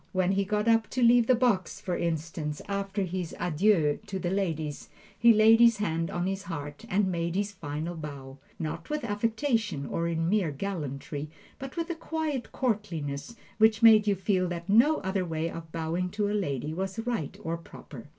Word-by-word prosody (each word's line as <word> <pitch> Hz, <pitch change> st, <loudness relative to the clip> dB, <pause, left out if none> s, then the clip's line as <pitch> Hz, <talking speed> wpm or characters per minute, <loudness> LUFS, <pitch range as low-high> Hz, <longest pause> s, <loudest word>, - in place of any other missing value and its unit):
When 185 Hz, 0 st, +2 dB
he 195 Hz, 0 st, +1 dB
got 210 Hz, +2 st, 0 dB
up 225 Hz, -1 st, +3 dB
to 250 Hz, -, +3 dB
leave 235 Hz, 0 st, +6 dB
the 255 Hz, -, +5 dB
box, 230 Hz, -7 st, +1 dB
for 180 Hz, -, -3 dB
instance, 160 Hz, -2 st, -3 dB
after 200 Hz, 0 st, -2 dB
his 180 Hz, -2 st, -4 dB
adieux 170 Hz, -3 st, +2 dB
to 195 Hz, -, -3 dB
the 180 Hz, -1 st, -2 dB
ladies, 160 Hz, -7 st, -2 dB, 0.3 s
he 235 Hz, -, +6 dB
laid 220 Hz, +1 st, +6 dB
his 235 Hz, -1 st, +6 dB
hand 165 Hz, -5 st, -1 dB
on 175 Hz, 0 st, -2 dB
his 195 Hz, +1 st, -2 dB
heart 145 Hz, -6 st, -7 dB
and 190 Hz, 0 st, +2 dB
made 170 Hz, 0 st, -2 dB
his 205 Hz, +1 st, 0 dB
final 160 Hz, -2 st, -5 dB
bow 140 Hz, -4 st, -8 dB, 0.2 s
not 155 Hz, -, -5 dB
with 300 Hz, -1 st, -2 dB
affectation, 220 Hz, -, -1 dB
or 170 Hz, +4 st, -2 dB
in 165 Hz, -1 st, -1 dB
mere 195 Hz, -3 st, +2 dB
gallantry, 145 Hz, -3 st, -4 dB, 0.3 s
but 270 Hz, +4 st, -8 dB
with 335 Hz, +1 st, -2 dB
a -, -, -3 dB
quiet 315 Hz, -6 st, -3 dB
courtliness 190 Hz, -, -2 dB, 0.2 s
which 220 Hz, 0 st, +4 dB
made 215 Hz, -2 st, +8 dB
you 200 Hz, -, +3 dB
feel 185 Hz, -1 st, +1 dB
that 170 Hz, 0 st, -5 dB
no 235 Hz, +10 st, +5 dB
other 190 Hz, -1 st, -1 dB
way 165 Hz, -1 st, -2 dB
of 165 Hz, -1 st, -8 dB
bowing 165 Hz, +3 st, -2 dB
to 205 Hz, +2 st, -1 dB
a -, -, -1 dB
lady 150 Hz, -, -2 dB
was 190 Hz, +4 st, -3 dB
right 230 Hz, -, -2 dB
or 165 Hz, +1 st, -2 dB
proper. 145 Hz, -6 st, -11 dB
185 Hz, 190 wpm, -28 LUFS, 160-215 Hz, 0.3 s, made